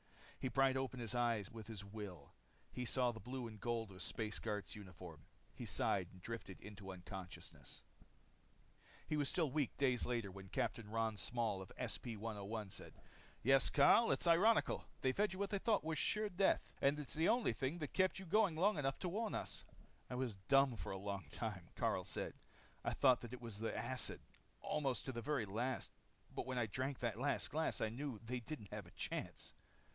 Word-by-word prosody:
He 130 - -1
pried 135 +2 +4
open 130 -1 -1
his 115 -1 -2
eyes 115 -5 +1
with 110 -2 -8
his 105 -3 -6
will. 100 -8 -7 0.4
He 125 - -3
saw 125 0 +2
the 110 - -8
blue 125 +1 -4
and 110 -2 -7
gold 115 -3 -1
of 95 - -11
a - - -12
space 105 +4 -2
guard's 105 0 -3
uniform. 90 -6 -10 0.3
He - - -6
sighed 95 -3 +2
and 95 - -13
drifted 100 -1 -5
into 100 -2 -9
unconsciousness. 95 0 -8 1.2
He 155 - 0
was 145 -3 +2
still 160 -6 +1
weak 145 -2 0
days 130 -4 +3
later 115 -5 -1
when 95 0 -9
Capt. 100 - 0
Ron 110 0 -1
Small 115 -4 0
of 95 - -9
SP 115 -3 -3
101 105 -1 -4
said, - - -6 0.5
"Yes, 135 +3 +6
Karyl, 225 +10 +7
it's - - +2
ironical. 185 +7 +5 0.2
They 130 - +4
fed 205 +7 +2
you - - -6
what 200 0 -1
they 200 - +1
thought 215 0 +3
was 160 -2 -1
sure 215 0 +2
death, 190 +1 +2
and 140 +2 +4
it's 150 -2 -5
the 160 +2 +3
only 240 0 +4
thing 135 +5 -1
that 150 -5 -4
kept 185 -1 +3
you 190 - -6
going 195 -1 +4
long 185 +1 +3
enough 135 -1 +1
to 180 - 0
warn 215 +4 -1
us." - - -3 0.5
"I 125 - -3
was 125 -5 -1
dumb 135 -2 +6
for - - -4
a 95 - -2
long 100 -2 -3
time," 95 -3 -4
Karyl - - +1
said. - - -3 0.5
"I - - 0
thought 130 -3 +5
that 120 0 -7
it 125 - -6
was 115 -4 -5
the 110 0 -1
acid, 120 +4 -1 0.4
almost 135 -4 0
to 130 - -1
the 120 -2 -4
very 135 -2 0
last. 120 +6 -1 0.4
But - - -3
when 130 -1 -1
I 120 - +3
drank 130 +6 -2
that 115 -2 -1
last 140 +2 +1
glass, 160 +2 +1
I 110 - +1
knew 130 +1 -3
they 125 +2 -1
didn't 115 -5 -7
have 105 -4 -5
a - - -14
chance. - - -4
120 Hz, 200 wpm, -40 LUFS, 105-140 Hz, 1.2 s, Karyl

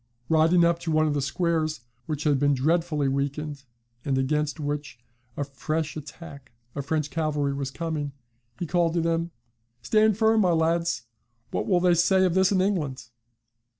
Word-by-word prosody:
Riding 165 +2 +4
up 170 0 +2
to 170 -1 -3
one 155 0 +3
of 150 - +1
the 145 - 0
squares, 160 0 -1 0.3
which 150 -2 -3
had 145 -3 +2
been 145 0 +3
dreadfully 155 +1 +1
weakened, 140 +1 -3 0.4
and 135 -2 0
against 150 +4 0
which 145 -3 -4 0.4
a 145 - 0
fresh 155 +2 -3
attack 140 -3 -10 0.2
of 140 -1 -5
French 155 -1 -1
cavalry 150 -3 0
was 140 -1 -3
coming, 150 0 -3 0.5
he 175 - -3
called 170 0 +1
to 170 - +2
them: 165 0 0 0.5
"Stand 215 -2 +3
firm, 220 0 +4
my 180 -3 +3
lads; 165 -3 +1 0.5
what - - -2
will 180 -3 +3
they 180 -1 +4
say 185 +3 +4
of 180 - +1
this 190 +1 +3
in 190 -2 +3
England?" 150 - -2
155 Hz, 170 wpm, -26 LUFS, 145-170 Hz, 0.5 s, Riding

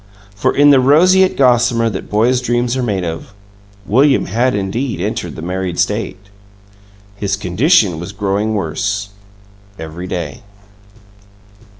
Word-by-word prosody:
For, 115 +6 0
in 145 0 +5
the 135 - +6
roseate 185 +8 +4
gossamer 120 -3 +3
that 100 -4 -5
boys' 120 +4 +2
dreams 120 0 -1
are 130 - -1
made 100 -6 -2
of, 95 - -6 0.5
William 135 +7 +3
had 120 +6 0
indeed 115 +6 -3
entered - - -4
the 80 - -8
married 90 0 -3
state. 100 0 -1 1.0
His 100 -1 -2
condition 100 - +2
was 85 +3 -7
growing 105 +2 -1
worse, 100 +3 -2 0.7
every 80 +3 -7
day. 85 -6 -5
105 Hz, 125 wpm, -16 LUFS, 95-125 Hz, 1.0 s, the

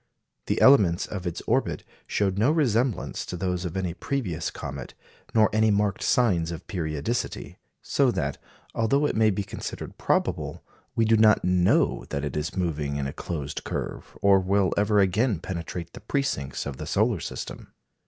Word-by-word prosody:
The - - +1
elements 100 -11 +6
of 95 -4 -5
its 85 - -4
orbit - - 0 0.2
showed 100 -1 0
no 115 +6 +4
resemblance 130 - +1
to 90 - -4
those 90 0 -2
of 90 +2 -4
any 90 -3 -1
previous 90 - -2
comet, 70 -3 -7 0.4
nor 110 -1 +6
any 110 0 +4
marked 100 -1 +1
signs 90 -10 +2
of 85 -2 -6
periodicity. 80 +5 -3 0.2
So 140 -2 +2
that, 75 -11 -2 0.3
although 135 +6 +2
it - - 0
may 110 0 +4
be 100 0 -1
considered - - -7
probable, - - 0 0.3
we 115 - +3
do 110 0 +4
not 110 -1 +5
know 90 0 +2
that 70 +1 -2
it 70 - -4
is 75 +6 -3
moving 75 -5 -1
in 70 -1 -2
a 70 - -4
closed 75 -4 -5
curve, - - -5
or 100 -1 +6
will 95 0 +2
ever 105 0 +3
again 100 +3 +2
penetrate 85 -1 -5
the - - -10
precincts 100 - -2
of 70 -2 -5
the 75 - -6
solar 105 +3 +2
system. - - -7
95 Hz, 170 wpm, -26 LUFS, 85-110 Hz, 0.4 s, elements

